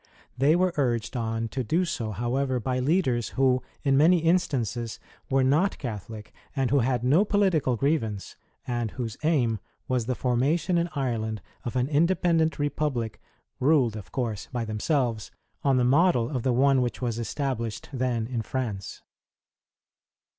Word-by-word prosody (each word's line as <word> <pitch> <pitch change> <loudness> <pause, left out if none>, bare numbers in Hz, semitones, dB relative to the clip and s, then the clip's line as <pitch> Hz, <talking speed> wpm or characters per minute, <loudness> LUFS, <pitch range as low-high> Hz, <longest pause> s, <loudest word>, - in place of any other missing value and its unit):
They 140 +5 +4
were 180 0 +2
urged 120 -3 0
on 115 -1 -1
to 130 +2 -3
do 165 - +1
so, 120 -9 -3
however, 125 +4 -1
by 130 +2 -1
leaders 130 -5 +1
who, 130 -1 +3 0.2
in 135 -2 +3
many 165 +5 +6
instances, 130 - 0 0.3
were 135 0 +3
not 155 +10 +2
Catholic, 110 -3 -7 0.2
and 135 -3 0
who 140 - +4
had 125 -1 0
no 145 +10 +4
political 190 - +2
grievance, 115 -7 -1 0.3
and 120 -2 -2
whose 115 -1 -5
aim 130 -9 +1 0.3
was 125 -3 0
the 130 - 0
formation 140 +9 +1
in 170 +1 -1
Ireland 115 -5 -2 0.3
of 120 - -4
an 125 0 +1
independent 165 +1 +2
republic 145 -6 -2 0.4
ruled, 130 -5 +3
of 95 -4 -9
course, 115 -6 -3
by 120 -3 -2
themselves, 115 0 -1 0.3
on 135 -2 +3
the 125 - +3
model 140 -2 +3
of 125 - 0
the 130 - +1
one 135 +2 +4
which 120 -1 -2
was 120 -2 -2
established 115 -2 -3
then 125 -3 0
in 120 -1 -3
France. 110 -6 -4
130 Hz, 155 wpm, -26 LUFS, 115-145 Hz, 0.4 s, many